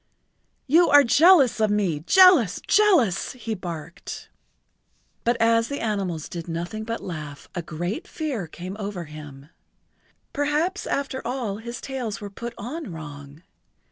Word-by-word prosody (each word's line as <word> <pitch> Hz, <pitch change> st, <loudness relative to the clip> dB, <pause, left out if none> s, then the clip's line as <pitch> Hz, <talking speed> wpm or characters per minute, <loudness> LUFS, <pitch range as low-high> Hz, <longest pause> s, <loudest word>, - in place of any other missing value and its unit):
"You 330 Hz, +5 st, +5 dB
are 290 Hz, 0 st, +8 dB
jealous 280 Hz, 0 st, +5 dB
of 215 Hz, -1 st, +3 dB
me—jealous—jealous," 225 Hz, -, +4 dB
he 230 Hz, -3 st, -5 dB
barked. 170 Hz, -4 st, -7 dB, 1.0 s
[Pg 240 Hz, +1 st, +3 dB
84]But -, -, -6 dB
as 230 Hz, 0 st, +3 dB
the 280 Hz, -, -4 dB
animals 195 Hz, -8 st, -2 dB
did 170 Hz, -1 st, -7 dB
nothing 175 Hz, +6 st, -4 dB
but 230 Hz, 0 st, -4 dB
laugh 150 Hz, -5 st, -7 dB
a 175 Hz, -, -3 dB
great 175 Hz, -, -4 dB
fear 270 Hz, -, -4 dB
came 180 Hz, +4 st, -8 dB
over 200 Hz, -4 st, -4 dB
him. 150 Hz, -2 st, -11 dB, 0.8 s
Perhaps 300 Hz, +7 st, 0 dB
after 275 Hz, -1 st, -2 dB
all 235 Hz, -5 st, -3 dB
his 235 Hz, +2 st, -7 dB
tails 250 Hz, -5 st, -4 dB
were 205 Hz, -2 st, -8 dB
put 235 Hz, +4 st, -7 dB
on 265 Hz, -, -6 dB
wrong! 145 Hz, -1 st, -10 dB
215 Hz, 135 wpm, -24 LUFS, 170-265 Hz, 1.0 s, are